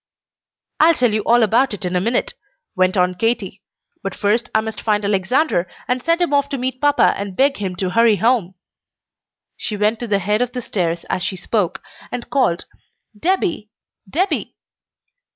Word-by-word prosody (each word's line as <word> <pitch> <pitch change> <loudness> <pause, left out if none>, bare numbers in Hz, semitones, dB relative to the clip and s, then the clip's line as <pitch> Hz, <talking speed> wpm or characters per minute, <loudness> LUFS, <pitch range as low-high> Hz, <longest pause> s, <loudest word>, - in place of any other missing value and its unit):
"I'll 325 +2 +6
tell 245 -4 +2
you 215 - +1
all 240 0 +5
about 230 +2 +2
it 195 - -6
in 180 0 -2
a 180 - +2
minute," 240 - 0 0.4
went 185 +1 +2
on 180 0 +3
Katy. 205 -1 -2 0.4
"But 195 - -4
first 215 +3 0
I - - +6
must 220 0 -5
find 210 -2 0
Alexander, 200 - +1 0.2
and 250 +1 0
send 335 +5 +1
him 345 -4 +1
off 280 0 +2
to 275 - -2
meet 255 0 -3
papa 290 0 +4
and 200 -1 -5
beg 275 +4 +2
him 190 -3 -3
to 185 0 -2
hurry 230 +1 +4
home." 215 -4 +1 1.0
She 210 - -3
went 210 +2 +1
to 240 - -4
the 205 -2 +2
head 210 +4 0
of 245 -1 -1
the 250 - -3
stairs 170 -5 -2
as - - -2
she 190 - -2
spoke, 195 -1 -1 0.3
and 245 -1 -6
called 250 -11 +1 0.5
"Debby! 340 - -1 0.4
Debby!" 350 - -1
220 Hz, 180 wpm, -19 LUFS, 195-255 Hz, 1.0 s, I'll